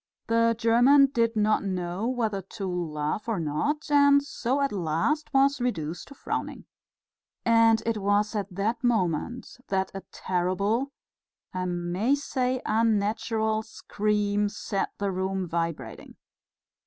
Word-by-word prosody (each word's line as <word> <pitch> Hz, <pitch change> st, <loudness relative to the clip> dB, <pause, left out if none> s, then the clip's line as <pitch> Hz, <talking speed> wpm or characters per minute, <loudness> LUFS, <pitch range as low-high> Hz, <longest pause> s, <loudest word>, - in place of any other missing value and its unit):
The 230 Hz, 0 st, +2 dB
German 250 Hz, +5 st, +5 dB
did 230 Hz, -1 st, +1 dB
not 215 Hz, 0 st, +2 dB
know 185 Hz, +2 st, -2 dB
whether 225 Hz, -6 st, -1 dB
to 195 Hz, +2 st, -7 dB
laugh 175 Hz, +2 st, -3 dB
or 220 Hz, -, 0 dB
not, 285 Hz, -, -2 dB
and 285 Hz, -1 st, +5 dB
so 265 Hz, -1 st, -2 dB
at 280 Hz, -1 st, +1 dB
last 185 Hz, -, -1 dB
was 275 Hz, 0 st, +3 dB
reduced 170 Hz, -9 st, -3 dB
to 280 Hz, -, -13 dB
frowning. -, -, -4 dB, 0.8 s
And 230 Hz, -1 st, +4 dB
it 230 Hz, -1 st, 0 dB
was 205 Hz, +2 st, +1 dB
at 205 Hz, -2 st, -1 dB
that 210 Hz, +6 st, -2 dB
moment 225 Hz, 0 st, -1 dB
that 190 Hz, -1 st, -1 dB
a 195 Hz, -, -6 dB
terrible, 200 Hz, +8 st, -1 dB, 0.6 s
I 185 Hz, 0 st, -2 dB
may 180 Hz, +8 st, 0 dB
say 260 Hz, -3 st, -2 dB
unnatural, 220 Hz, 0 st, +1 dB
scream 210 Hz, -1 st, -1 dB
set 195 Hz, -1 st, -3 dB
the 200 Hz, -1 st, -1 dB
room 190 Hz, 0 st, -2 dB
vibrating. 165 Hz, -8 st, -4 dB
215 Hz, 130 wpm, -27 LUFS, 185-240 Hz, 0.8 s, German